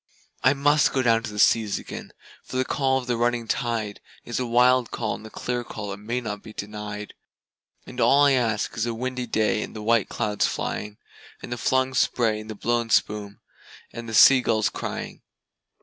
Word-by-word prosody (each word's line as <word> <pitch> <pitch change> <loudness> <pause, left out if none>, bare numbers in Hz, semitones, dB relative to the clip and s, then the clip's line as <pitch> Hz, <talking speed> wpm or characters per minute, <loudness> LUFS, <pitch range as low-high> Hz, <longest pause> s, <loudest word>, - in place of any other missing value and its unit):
I 130 - +5
must 145 +2 +3
down 130 - +2
go 115 -2 +4
to 115 -1 -7
the 105 - -8
seas 105 0 +3
again, - - -8 0.3
for 130 - -6
the 130 - +1
call 135 -1 +1
of 130 - -4
the 125 -1 0
running 120 -1 0
tide 115 -5 -2 0.2
Is 120 - -3
a 125 - -2
wild 125 +1 +4
call 110 -2 -2
and 110 - -8
a - - -11
clear 120 +2 -3
call 105 -3 -6
that 100 - -5
may 115 +4 -3
not 105 -4 -5
be 110 0 -12
denied; 105 0 -6 0.7
And - - -6
all 140 +1 +5
I 140 - +5
ask 115 -5 0
is 115 0 -1
a 115 - -2
windy 125 +1 -3
day 110 -1 +1
with - - -7
the 105 - -6
white 115 -2 +2
clouds 105 -1 0
flying, 105 0 -4 0.5
And - - -8
the - - -2
flung 130 +1 +1
spray 115 -4 +1
and 110 +1 -10
the 110 - -5
blown 120 +2 -1
spume, 105 -2 0 0.5
and 115 0 -7
the 110 - -3
sea 130 +4 +8
gulls 110 -3 +1
crying. - - -6
115 Hz, 205 wpm, -24 LUFS, 105-125 Hz, 0.7 s, sea